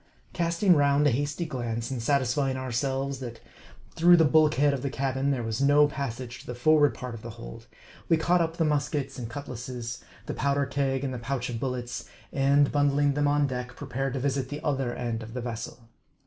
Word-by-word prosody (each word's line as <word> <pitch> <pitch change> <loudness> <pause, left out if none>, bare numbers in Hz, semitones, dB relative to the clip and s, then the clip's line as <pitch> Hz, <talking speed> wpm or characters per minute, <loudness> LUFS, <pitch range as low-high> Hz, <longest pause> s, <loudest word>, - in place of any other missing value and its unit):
Casting 170 +2 +3
round 145 0 +3
a 145 - +5
hasty 145 +6 -1
glance, 120 -5 -3
and 130 -3 -3
satisfying 135 +1 +1
ourselves, 135 +2 -2
that 120 -3 -7 0.5
through 175 +1 +6
the 160 - +5
bulkhead 150 -1 +4
of 135 - -3
the 140 - -2
cabin, 135 0 -1
there 130 -4 0
was 115 +2 -2
no 145 +1 +5
passage 130 -3 -5
to - - -14
the 125 - -5
forward 145 +3 +4
part 125 -1 -6
of 115 - -8
the 115 - -7
hold, - - -10 0.4
we 165 - +5
caught 175 +2 +2
up 165 0 -1
the 165 - +2
muskets 145 -2 -1
and 115 -2 -5
cutlasses, 125 -2 -6 0.2
the - - -4
powder 140 +1 +1
keg 135 -1 -1
and 135 -2 -2
the 125 - -4
pouch 125 0 -3
of 115 - -4
bullets, 125 -1 -4 0.2
and 140 +1 +3
bundling 145 0 +2
them 145 +1 +1
on 145 0 +3
deck, 125 -2 -4
prepared 135 -1 -3
to 135 - -2
visit 135 -1 -1
the 145 - -5
other 135 -5 0
end 120 -2 -3
of 115 +2 -9
the 125 - -2
vessel. 115 0 -6
135 Hz, 205 wpm, -27 LUFS, 125-145 Hz, 0.5 s, through